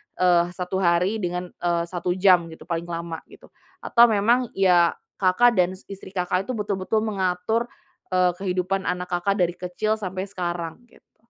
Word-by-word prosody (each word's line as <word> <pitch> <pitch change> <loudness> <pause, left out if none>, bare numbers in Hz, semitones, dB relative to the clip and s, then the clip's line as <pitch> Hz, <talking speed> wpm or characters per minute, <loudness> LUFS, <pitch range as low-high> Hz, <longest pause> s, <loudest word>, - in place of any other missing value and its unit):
eee, 175 -1 +4
1 180 +1 -3
hari, 180 +4 +2
dengan, 180 -1 -3
eee, 170 -1 -1
1 175 0 -2
jam 180 -3 +4
gitu - - -13
paling 170 0 -2
lama." 170 -1 -4
Gitu. - - -17 0.3
Atau 235 0 +6
memang, 230 +4 +3
ya, 180 -3 +4 0.3
Kakak 200 +6 +4
dan 180 +1 +3 0.2
istri 195 -1 -10
Kakak 180 +1 0
itu 255 - -2
betul-betul 210 0 -1
mengatur, 205 +2 -1 0.5
eee, 180 -1 +4
kehidupan 190 0 -1
anak 180 0 -2
Kakak 180 +2 0
dari 175 0 0
kecil 215 +5 -2
sampai 190 -1 -4
sekarang, 175 -2 -4
gitu? - - -26
185 Hz, 160 wpm, -24 LUFS, 175-200 Hz, 0.5 s, Atau